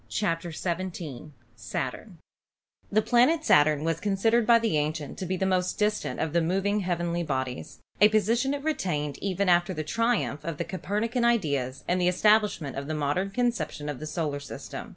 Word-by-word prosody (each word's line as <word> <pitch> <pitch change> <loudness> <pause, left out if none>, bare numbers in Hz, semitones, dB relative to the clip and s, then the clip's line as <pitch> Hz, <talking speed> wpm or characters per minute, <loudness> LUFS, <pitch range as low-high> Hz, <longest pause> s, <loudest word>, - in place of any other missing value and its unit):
CHAPTER 170 -4 -1
XVII 170 -5 -4 1.6
The 215 +1 +4
planet 280 +9 +3
Saturn 150 0 +4
was 165 0 0
considered 215 +4 +1
by 235 - +7
the 225 -7 0
ancients 150 -1 -3
to 185 - -4
be 185 +1 -1
the 190 - 0
most 185 -1 0
distant 210 0 -1
of 160 -1 -2
the 170 - +3
moving 195 +5 +1
heavenly 175 -2 -1
bodies, 130 -5 -3 0.2
a 210 - +8
posi 220 +2 +2
tion 270 +2 0
it 280 - -7
retained 155 - -2
even 195 0 -1
after 175 +1 +3
the 155 - -3
triumph 230 -3 0
of 165 -3 -4
the - - -1
Copernican 220 +5 -2
ideas 145 - 0
and 180 +1 +1
the 175 - +3
establishment 205 -6 +2
of 140 +1 -4
the 155 - -2
modern 150 +6 0
conception 230 -9 -2
of 145 - -5
the 155 - -6
solar 150 -3 -2
system. 140 - -8
180 Hz, 175 wpm, -27 LUFS, 155-215 Hz, 1.6 s, a